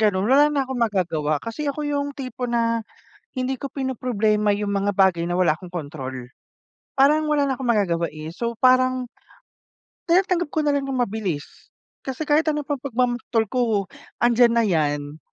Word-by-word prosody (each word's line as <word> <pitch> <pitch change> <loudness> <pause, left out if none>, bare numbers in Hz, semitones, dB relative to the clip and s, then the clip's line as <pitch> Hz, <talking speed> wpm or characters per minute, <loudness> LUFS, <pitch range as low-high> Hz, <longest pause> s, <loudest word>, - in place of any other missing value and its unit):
ganun. 205 -3 +2
Wala 280 +5 +5
na 280 -2 0
akong 260 -1 -4
magagawa. 175 -9 0
Kasi 230 - -4
ako 295 +2 -3
yung 285 -1 -2
tipo 255 -2 -5
na 230 -1 +1 0.5
hindi 260 -1 -2
ko 275 - -7
pinoproblema 220 -6 0
yung 205 0 -2
mga 200 0 0
bagay 185 -3 +3
na 175 - -2
wala 175 -3 +2
akong 180 -1 -12
control. 130 -6 -6 0.7
Parang 300 +3 +4
wala 290 -2 +2
na 265 - 0
akong 255 -2 -2
magagawa 170 -6 +1
eh. 155 +2 -8
So, 235 0 -4
parang 255 0 +3 1.0
tinatanggap 355 0 +2
ko 310 - +2
nalang 285 -2 0
yung 255 -2 0
mabilis. 195 -9 -3 0.6
Kasi 265 +3 -4
kahit 305 +2 +2
ano 300 -1 0
pang 285 -2 -3
pagmamaktol 245 -3 0
ko, 225 -6 0 0.3
andiyan 240 0 +5
na 235 - +4
yan. 150 -5 -1
235 Hz, 165 wpm, -23 LUFS, 190-270 Hz, 1.0 s, Wala